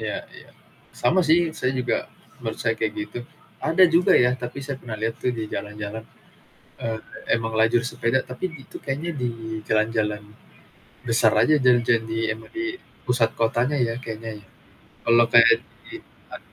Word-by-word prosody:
Iya - - -3 0.2
iya. - - -14 0.5
Sama 170 +10 +4
sih 170 +1 +4
saya 130 -4 +1
juga 125 -2 -1 0.4
menurut 110 -1 -4
saya 110 -1 +1
kayak 110 -2 0
gitu, 105 - -5 0.4
ada 165 +4 +5
juga 170 +1 +4
ya, 125 0 +5
tapi 125 +1 -6
saya 135 -1 -4
pernah 115 -4 -7
lihat 115 +1 -1
tuh 125 - +2
di 110 -2 -4
jalan-jalan, 105 +1 -5 0.8
eee, 115 -1 -2 0.4
emang 115 -1 -3
lajur 115 +2 +3
sepeda, 125 +2 0
tapi 145 +8 -5
itu - - -10
kayaknya 145 +6 -3
di 125 -3 -1 0.4
jalan-jalan 110 -1 0 0.8
besar 115 -1 +3
aja, 155 - +4
jalan-jalan 120 -3 +3
di 115 0 -3
emang 110 +1 -7
di 340 +2 -3 0.3
pusat 120 -2 +2
kotanya 120 +5 +1
ya, 115 -3 +1
kayaknya 110 -2 -7
ya. - - -22 0.6
Kalau 115 0 +6
kayak 115 -1 +7 0.3
di - - -6 0.3
ad - - -8
115 Hz, 160 wpm, -24 LUFS, 110-130 Hz, 0.8 s, kayak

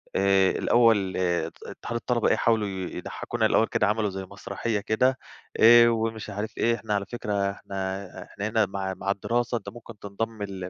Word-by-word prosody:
آآ 95 -1 +4
الأول 110 -6 +3
آآ 90 -2 0
ات - - -13
اتحاد 120 - -7
الطلبة 120 -1 0
إيه - - +3
حاولوا 110 -2 +1
ي 95 -2 -5
يضحكونا - - -3
الأول - - +3
كده 105 - +1
عملوا 105 0 +1
زي 95 0 -6
مسرحية 105 +2 -4
كده 125 +5 +1 0.4
آآ 120 +1 +8
ومش 110 -1 -2
عارف 105 +3 -5
إيه 115 0 +2
إحنا 110 -2 -4
على 100 -1 0
فكرة 100 -3 -2
إحنا 95 -1 -5 0.2
إحنا 100 - -5
هنا 110 0 +2
مع 95 -1 -4
مع 100 +1 -1
الدراسة 120 +4 -1
أنت 105 - -8
ممكن 115 -2 -12
تنضم 105 +2 -5
ل 95 -2 -6
105 Hz, 185 wpm, -26 LUFS, 100-115 Hz, 0.4 s, آآ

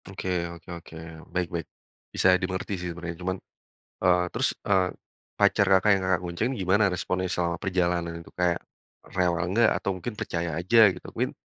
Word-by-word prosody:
Oke 95 -1 -6 0.3
oke 85 -1 -14
oke, 85 -1 -13 0.4
baik 90 -1 +1
baik. 85 -3 -3 0.5
Bisa - - +3
dimengerti 95 +2 -3
sih 90 - -3
sebenarnya 85 0 -6
cuman 95 +1 -1 0.7
eee, 90 0 +5
terus, - - +1 0.2
eee, 95 -2 +4 0.5
pacar 100 - +4
Kakak 95 +2 +5
yang 95 -1 0
Kakak 95 -2 +2
bonceng 90 +8 -1
gimana 95 +3 +3
responnya 90 +1 -1
selama 85 -1 0
perjalanan 90 -3 0
itu - - -16
kayak, 90 -1 +2 0.6
rewel 90 -2 +2
nggak 110 +3 +5
atau - - -3
mungkin 110 +4 -5
percaya 85 -4 -3
aja 95 +7 +3 0.2
gitu - - -12
mungkin - - -1
90 Hz, 170 wpm, -27 LUFS, 85-95 Hz, 0.7 s, eee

